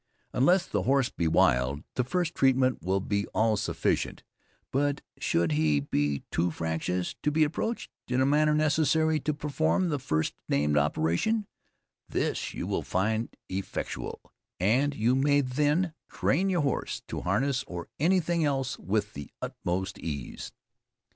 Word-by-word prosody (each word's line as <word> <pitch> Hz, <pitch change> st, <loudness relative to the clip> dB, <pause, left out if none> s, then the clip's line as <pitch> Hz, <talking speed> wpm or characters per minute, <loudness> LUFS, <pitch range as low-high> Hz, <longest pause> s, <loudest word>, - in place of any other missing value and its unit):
Unless 175 Hz, +8 st, +4 dB
the 105 Hz, -, -1 dB
horse 135 Hz, +5 st, +2 dB
be 85 Hz, -, -1 dB
wild, 70 Hz, -1 st, +3 dB
the 125 Hz, -, +1 dB
first 170 Hz, +5 st, -1 dB
treatment 130 Hz, -, +3 dB
will 95 Hz, +3 st, +1 dB
be 100 Hz, +1 st, -1 dB
all 110 Hz, 0 st, +3 dB
sufficient; 105 Hz, -, -1 dB, 0.5 s
but 145 Hz, +1 st, +1 dB, 0.2 s
should 85 Hz, -1 st, +1 dB
he 75 Hz, -1 st, +3 dB
be 70 Hz, 0 st, -1 dB
too 85 Hz, +1 st, +1 dB
fractious 80 Hz, +2 st, -2 dB
to -, -, +2 dB
be 155 Hz, +1 st, +3 dB
approached 195 Hz, +10 st, -2 dB, 0.2 s
in 125 Hz, +1 st, 0 dB
a 130 Hz, -, +4 dB
manner 150 Hz, +2 st, +3 dB
necessary 155 Hz, +1 st, +2 dB
to 155 Hz, -, -1 dB
perform 155 Hz, +5 st, 0 dB
the 145 Hz, -3 st, -1 dB
first 80 Hz, -11 st, 0 dB, 0.2 s
named 75 Hz, +1 st, +2 dB
operation, 80 Hz, -, +1 dB, 0.6 s
this -, -, -1 dB
you -, -, -4 dB
will -, -, -1 dB
find 110 Hz, +5 st, -1 dB
effectual, 95 Hz, +1 st, -4 dB, 0.4 s
and 130 Hz, +10 st, +2 dB
you 120 Hz, +2 st, +2 dB
may 145 Hz, +2 st, +3 dB
then 150 Hz, +6 st, +1 dB, 0.2 s
train 185 Hz, +8 st, +1 dB
your 180 Hz, -3 st, +2 dB
horse 140 Hz, -3 st, -2 dB
to -, -, -4 dB
harness 130 Hz, +9 st, +1 dB
or 85 Hz, -1 st, -6 dB
anything 170 Hz, 0 st, +2 dB
else 135 Hz, -4 st, -1 dB
with 105 Hz, +1 st, -1 dB
the 70 Hz, -1 st, -7 dB
utmost 95 Hz, +2 st, -3 dB
ease. 70 Hz, -6 st, -5 dB
125 Hz, 145 wpm, -28 LUFS, 90-150 Hz, 0.6 s, Unless